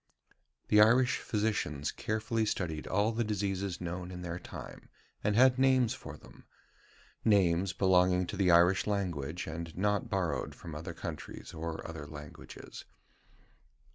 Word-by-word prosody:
The 105 Hz, -, +7 dB
Irish 120 Hz, +3 st, +5 dB
physicians 105 Hz, -10 st, -1 dB
carefully 110 Hz, +1 st, -1 dB
studied 80 Hz, -7 st, -2 dB
all 105 Hz, +4 st, +2 dB
the 115 Hz, +1 st, 0 dB
diseases 100 Hz, -3 st, -2 dB
known 90 Hz, +1 st, -5 dB
in 90 Hz, -1 st, -7 dB
their 85 Hz, 0 st, -4 dB
time, -, -, -10 dB, 0.3 s
and 105 Hz, -, +1 dB
had 130 Hz, +2 st, +5 dB
names 130 Hz, -3 st, +4 dB
for -, -, -9 dB
them -, -, -16 dB, 0.8 s
names 95 Hz, -3 st, +3 dB
belonging 90 Hz, 0 st, +3 dB
to 95 Hz, -, -5 dB
the 95 Hz, -2 st, +2 dB
Irish 90 Hz, +3 st, +5 dB
language, 90 Hz, -6 st, -2 dB
and 80 Hz, +1 st, -6 dB
not 105 Hz, +5 st, 0 dB
borrowed 90 Hz, -8 st, -1 dB
from 85 Hz, -3 st, -9 dB
other 80 Hz, +2 st, -6 dB
countries 80 Hz, -5 st, -7 dB
or 80 Hz, 0 st, -5 dB
other 80 Hz, -3 st, -7 dB
languages. 75 Hz, -1 st, -10 dB
95 Hz, 140 wpm, -31 LUFS, 85-105 Hz, 0.8 s, The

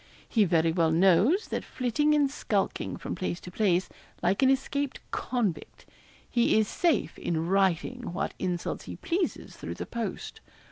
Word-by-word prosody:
He 220 Hz, -3 st, +3 dB
very 165 Hz, -2 st, +3 dB
well 165 Hz, -1 st, +2 dB
knows 195 Hz, -, +4 dB
that -, -, -2 dB
flitting 295 Hz, +5 st, +1 dB
and 285 Hz, -2 st, +3 dB
skulking 205 Hz, -8 st, -1 dB
from -, -, -5 dB
place 180 Hz, -2 st, -3 dB
to 180 Hz, -, -9 dB
place, 185 Hz, -2 st, +2 dB, 0.4 s
like 190 Hz, +6 st, +2 dB
an 265 Hz, -, +5 dB
escaped 270 Hz, +1 st, 0 dB
convict, 225 Hz, -10 st, -2 dB, 0.4 s
he 235 Hz, -2 st, +3 dB
is 215 Hz, -1 st, +3 dB
safe 330 Hz, -, 0 dB
in 165 Hz, -1 st, -1 dB
writing 195 Hz, +5 st, +1 dB
what 175 Hz, -, -2 dB
insults 180 Hz, -2 st, -3 dB
he -, -, -7 dB
pleases 350 Hz, +1 st, -2 dB
through -, -, -6 dB
the -, -, -5 dB
post. 235 Hz, -2 st, -5 dB
205 Hz, 155 wpm, -28 LUFS, 175-265 Hz, 0.4 s, an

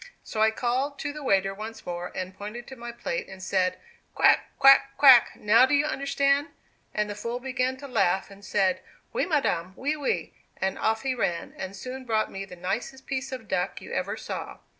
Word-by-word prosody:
So 215 Hz, -, -3 dB
I 220 Hz, -, +6 dB
called 255 Hz, +5 st, -1 dB
to 290 Hz, +1 st, -4 dB
the 300 Hz, -, -8 dB
waiter 195 Hz, -7 st, +2 dB
once 220 Hz, +3 st, -8 dB
more, 175 Hz, 0 st, -4 dB
and 185 Hz, 0 st, -5 dB
pointed 210 Hz, +5 st, -7 dB
to 265 Hz, -, -8 dB
my 235 Hz, -1 st, -7 dB
plate 200 Hz, -7 st, -4 dB
and 190 Hz, -, -9 dB
said, 185 Hz, -1 st, +1 dB, 0.4 s
'quack, -, -, +4 dB
quack, 275 Hz, 0 st, +6 dB
quack, 260 Hz, -5 st, +8 dB
now 230 Hz, +5 st, +5 dB
do 275 Hz, -, +3 dB
you 285 Hz, +1 st, +3 dB
understand?' 280 Hz, 0 st, +1 dB, 0.4 s
and 210 Hz, 0 st, 0 dB
the 205 Hz, -, -4 dB
fool 235 Hz, +4 st, -4 dB
began 260 Hz, 0 st, -1 dB
to 280 Hz, +1 st, -9 dB
laugh, 195 Hz, -6 st, +1 dB
and 200 Hz, 0 st, -14 dB
said, 205 Hz, +6 st, +1 dB, 0.3 s
'Oui, -, -, 0 dB
madame, 190 Hz, -, 0 dB
oui, 290 Hz, +4 st, -1 dB
oui,' 290 Hz, -3 st, -2 dB, 0.2 s
and 190 Hz, 0 st, -2 dB
off 220 Hz, +2 st, +1 dB
he 265 Hz, -1 st, 0 dB
ran, 185 Hz, -8 st, -2 dB
and 190 Hz, +1 st, -6 dB
soon 255 Hz, +6 st, -7 dB
brought 220 Hz, -2 st, 0 dB
me 195 Hz, 0 st, -5 dB
the 180 Hz, -, -11 dB
nicest 205 Hz, +9 st, -4 dB
piece 265 Hz, 0 st, -3 dB
of 250 Hz, -4 st, -7 dB
duck 180 Hz, -2 st, -1 dB
you -, -, -9 dB
ever -, -, -2 dB
saw. -, -, -6 dB
235 Hz, 205 wpm, -27 LUFS, 195-265 Hz, 0.4 s, quack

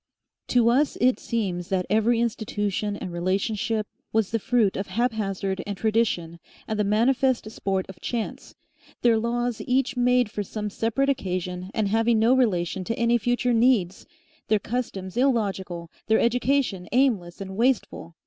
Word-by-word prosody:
To 240 Hz, -2 st, +4 dB
us 275 Hz, +5 st, +2 dB
it 255 Hz, +1 st, +3 dB
seems 190 Hz, -7 st, -2 dB
that 185 Hz, -2 st, 0 dB
every 220 Hz, +2 st, +2 dB
institution 210 Hz, -3 st, -1 dB
and 180 Hz, -, -6 dB
relationship 200 Hz, +5 st, -1 dB, 0.3 s
was 220 Hz, -3 st, +1 dB
the 230 Hz, -, 0 dB
fruit 230 Hz, -4 st, +2 dB
of 195 Hz, -, -3 dB
haphazard 200 Hz, -5 st, -1 dB
and 200 Hz, -1 st, -4 dB
tradition 200 Hz, -7 st, 0 dB, 0.3 s
and 220 Hz, -1 st, -2 dB
the -, -, +3 dB
manifest 235 Hz, +2 st, +2 dB
sport 195 Hz, -3 st, -2 dB
of 190 Hz, -, -12 dB
chance, 235 Hz, -3 st, -4 dB, 0.5 s
their 230 Hz, -2 st, +4 dB
laws 240 Hz, 0 st, -1 dB
each 265 Hz, +2 st, +1 dB
made 250 Hz, -2 st, +2 dB
for 210 Hz, -, -3 dB
some 210 Hz, +1 st, -4 dB
separate 230 Hz, +7 st, 0 dB
occasion 185 Hz, -6 st, -2 dB
and 215 Hz, -2 st, +1 dB
having 225 Hz, +2 st, +2 dB
no 225 Hz, +3 st, +4 dB
relation 190 Hz, -7 st, +1 dB
to 230 Hz, +5 st, -2 dB
any 235 Hz, 0 st, +3 dB
future 245 Hz, +2 st, +1 dB
needs, 225 Hz, -6 st, +2 dB, 0.4 s
their 215 Hz, -, +3 dB
customs 205 Hz, -4 st, -4 dB
illogical, 195 Hz, -9 st, 0 dB, 0.2 s
their 220 Hz, -, +4 dB
education 240 Hz, -6 st, +1 dB
aimless 220 Hz, -10 st, +1 dB
and 190 Hz, -1 st, -6 dB
wasteful. 230 Hz, -7 st, 0 dB
220 Hz, 150 wpm, -25 LUFS, 195-240 Hz, 0.5 s, To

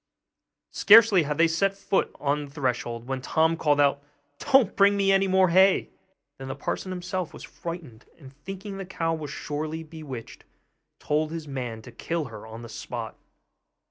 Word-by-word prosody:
Scarcely 215 Hz, -3 st, +7 dB
had 150 Hz, -1 st, -2 dB
they 165 Hz, +1 st, +5 dB
set 195 Hz, +4 st, 0 dB
foot 195 Hz, -1 st, 0 dB
on 145 Hz, +1 st, -1 dB
the -, -, -13 dB
threshold, 120 Hz, -4 st, -3 dB
when 135 Hz, -1 st, -3 dB
Tom 160 Hz, +4 st, +2 dB
called 150 Hz, -3 st, +1 dB
out, 140 Hz, 0 st, +3 dB, 0.4 s
'Don't 265 Hz, -7 st, +3 dB
bring 200 Hz, 0 st, +4 dB
me 195 Hz, -1 st, +3 dB
any 195 Hz, 0 st, +3 dB
more 190 Hz, -1 st, +4 dB
hay!' 190 Hz, +2 st, +4 dB, 0.5 s
Then 135 Hz, -, -7 dB
the 135 Hz, -, -4 dB
parson 185 Hz, +6 st, -4 dB
himself 180 Hz, -1 st, -4 dB
was -, -, -10 dB
frightened; 160 Hz, -10 st, -8 dB
and 135 Hz, -4 st, -14 dB
thinking 195 Hz, +6 st, -8 dB
the 195 Hz, -, -5 dB
cow 165 Hz, -2 st, -1 dB
was 155 Hz, -3 st, -5 dB
surely 155 Hz, +2 st, -4 dB
bewitched, 150 Hz, -7 st, -9 dB, 0.6 s
told 155 Hz, +1 st, 0 dB
his 160 Hz, -1 st, -6 dB
man 125 Hz, -5 st, -5 dB
to 125 Hz, -, -11 dB
kill 165 Hz, +6 st, -3 dB
her 110 Hz, +1 st, -9 dB
on 115 Hz, +1 st, -9 dB
the -, -, -8 dB
spot. 110 Hz, -, -6 dB
160 Hz, 175 wpm, -26 LUFS, 140-185 Hz, 0.6 s, Scarcely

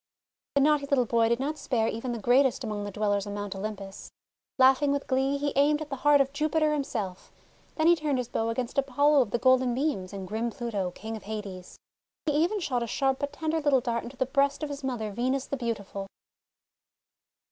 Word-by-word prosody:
The 280 Hz, -, +4 dB
naughty 295 Hz, 0 st, +3 dB
little 275 Hz, -3 st, +2 dB
boy 230 Hz, 0 st, +2 dB
did 235 Hz, +1 st, +1 dB
not 300 Hz, +3 st, -2 dB
spare 225 Hz, -4 st, 0 dB
even 230 Hz, +3 st, -3 dB
the 235 Hz, -, -3 dB
greatest 255 Hz, +4 st, +3 dB
among 210 Hz, -3 st, -3 dB
the 205 Hz, -, -5 dB
Dwellers 205 Hz, 0 st, 0 dB
on 205 Hz, -, -5 dB
Mount 205 Hz, -1 st, -4 dB
Olympus. 195 Hz, -1 st, -6 dB, 0.5 s
Laughing 265 Hz, +2 st, +5 dB
with 280 Hz, 0 st, -1 dB
glee, 270 Hz, +1 st, +1 dB
he 285 Hz, 0 st, -2 dB
aimed 295 Hz, +2 st, +3 dB
at 305 Hz, -2 st, -7 dB
the 275 Hz, -, -3 dB
heart 290 Hz, +2 st, +5 dB
of 275 Hz, 0 st, +1 dB
Jupiter 310 Hz, +1 st, +1 dB
himself; 230 Hz, -11 st, -4 dB, 0.4 s
then 315 Hz, -, 0 dB
he 345 Hz, +1 st, +7 dB
turned 300 Hz, -4 st, -1 dB
his 250 Hz, -2 st, -2 dB
bow 225 Hz, 0 st, -1 dB
against 245 Hz, +3 st, -1 dB
Apollo 285 Hz, +2 st, +3 dB
of 240 Hz, -, -1 dB
the 240 Hz, -, 0 dB
Golden 255 Hz, -1 st, +3 dB
Beams 255 Hz, -10 st, -1 dB
and 195 Hz, -2 st, -6 dB
grim 220 Hz, +4 st, -2 dB
Pluto, 215 Hz, -6 st, -3 dB
King 220 Hz, +5 st, -7 dB
of 220 Hz, -, -9 dB
Hades. 200 Hz, -4 st, -7 dB, 0.5 s
He 305 Hz, -, +2 dB
even 340 Hz, +8 st, +1 dB
shot 255 Hz, -9 st, -1 dB
a 235 Hz, -, -2 dB
sharp 270 Hz, +2 st, 0 dB
but 285 Hz, 0 st, -2 dB
tender 315 Hz, +2 st, -2 dB
little 290 Hz, -3 st, +4 dB
dart 235 Hz, -2 st, -2 dB
into 250 Hz, +2 st, -10 dB
the 260 Hz, -, +1 dB
breast 280 Hz, +2 st, +1 dB
of 300 Hz, -, -2 dB
his 285 Hz, 0 st, -6 dB
mother 235 Hz, -5 st, -3 dB
Venus 255 Hz, +5 st, -1 dB
the -, -, -3 dB
Beautiful. 205 Hz, -5 st, -4 dB
255 Hz, 210 wpm, -28 LUFS, 220-285 Hz, 0.5 s, he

